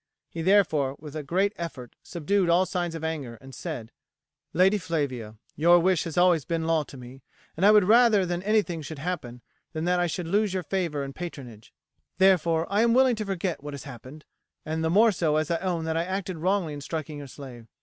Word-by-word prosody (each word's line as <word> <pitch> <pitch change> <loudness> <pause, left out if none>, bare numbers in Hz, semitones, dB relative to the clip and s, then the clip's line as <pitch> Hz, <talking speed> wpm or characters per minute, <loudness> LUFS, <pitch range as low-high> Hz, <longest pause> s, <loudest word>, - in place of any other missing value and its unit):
He, 165 - -5
therefore, 160 -7 +3
with 150 -1 -10
a 155 - -3
great 190 +8 0
effort 145 -8 -7
subdued 180 +2 0
all 175 +2 +4
signs 175 -3 -3
of 160 - -6
anger 150 -7 -4
and 135 +3 -14
said: 115 -2 -6 0.6
"Lady 190 +5 +3
Flavia, 130 - -3 0.2
your 170 +4 +5
wish 180 -1 +2
has 165 -1 -6
always 175 -4 +4
been 165 +3 -2
law 165 -1 +2
to 140 -2 -10
me, 125 +2 -12 0.3
and 170 - -3
I - - +8
would 210 -1 +6
rather 220 -1 +5
that 175 0 -2
anything 200 -6 +1
should 155 +1 -7
happen 140 -7 -5 0.3
than 160 0 -3
that 180 0 +2
I 175 - +2
should 170 +1 -4
lose 200 +1 +1
your 185 - -2
favour 170 -5 -2
and 135 0 -6
patronage, 130 -10 -9 0.5
therefore, 170 -4 +3
I 205 +2 +1
am 235 0 +3
willing 260 -1 +4
to 215 - -3
forget 190 -4 -3
what 145 -1 -6
has 140 - -9
happened, 135 +3 -11 0.4
the 160 +1 -1
more 215 +6 +5
so 165 -5 0
as 155 +1 0
I 170 - +2
own 180 -3 -2
that 160 0 -1
I 165 - +1
acted 185 -1 -3
wrongly 180 -1 0
in 145 - -7
striking 155 0 -5
your 140 - -8
slave. 125 -4 -11
165 Hz, 210 wpm, -26 LUFS, 145-185 Hz, 0.6 s, I